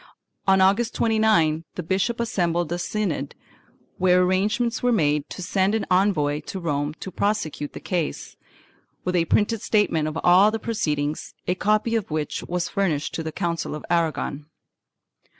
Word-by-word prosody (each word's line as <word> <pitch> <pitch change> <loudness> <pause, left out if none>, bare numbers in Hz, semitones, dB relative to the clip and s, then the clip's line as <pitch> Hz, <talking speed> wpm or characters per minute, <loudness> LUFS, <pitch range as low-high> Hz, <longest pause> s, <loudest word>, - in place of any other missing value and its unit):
On 190 0 +5
August 200 +5 +3
29th 215 -9 +2
the 180 - -4
bishop 195 +8 0
assembled 175 -8 0
a 175 - -1
synod 175 -7 -2 0.6
where 180 0 +4
arrangements 215 +6 +1
were 245 - +2
made 150 -8 +1
to 185 - -7
send 190 +3 +1
an 225 - -1
envoy 175 -6 +2
to 190 - -5
Rome 150 -3 -2
to 190 - -6
prosecute 170 -7 -2
the - - -7
case, 175 -5 -3 0.7
with 180 0 -1
a 170 -2 +3
printed 210 +5 +1
statement 165 -8 +1
of 155 +1 -4
all 185 +4 +6
the 220 - -2
proceedings, 150 -10 -2
a 180 - +1
copy 215 +4 +1
of 220 -4 -1
which 155 -1 -2
was 175 0 -2
furnished 165 -7 -1
to - - -3
the 160 0 -4
Council 170 -3 -2
of 150 - -8
Aragon. 160 -3 -1
180 Hz, 160 wpm, -24 LUFS, 155-210 Hz, 0.7 s, all